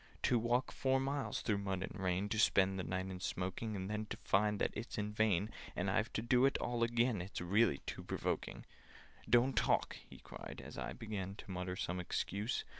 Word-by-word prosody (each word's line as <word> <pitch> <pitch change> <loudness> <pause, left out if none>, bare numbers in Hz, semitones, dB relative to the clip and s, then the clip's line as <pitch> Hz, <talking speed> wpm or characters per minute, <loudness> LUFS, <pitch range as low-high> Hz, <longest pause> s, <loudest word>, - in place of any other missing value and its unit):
"To 120 - +4
walk 120 +3 +1
four 135 0 +2
miles 135 +1 -1
through 105 -3 +1
mud 95 -2 -2
and - - -5
rain, 95 +2 +1
To 110 - 0
spend 95 -2 +4
the - - -1
night 95 +1 -2
in 90 - -6
smoking, 95 +4 -2
And 95 -1 -3
then 105 +1 -2
to - - -5
find 105 +1 +3
that - - +1
it's 115 +3 -5
in 105 0 -2
vain— 105 -1 +2 0.2
And 95 +2 0
I've 110 +3 +1
to 110 - -1
do 125 +2 +4
it 135 - +1
all 120 -1 -2
again— 120 -3 +2
It's 95 +3 -5
really 90 -3 +3
too - - -5
provoking! - - -2 0.6
"Don't 120 +3 +5
talk!" - - +2
he - - -11
cried, - - -9
as - - -9
I - - -4
began 100 -3 -4
To 100 - -9
mutter 90 0 -3
some 90 -1 -2
excuse. 100 +5 -1
105 Hz, 205 wpm, -36 LUFS, 95-115 Hz, 0.6 s, Don't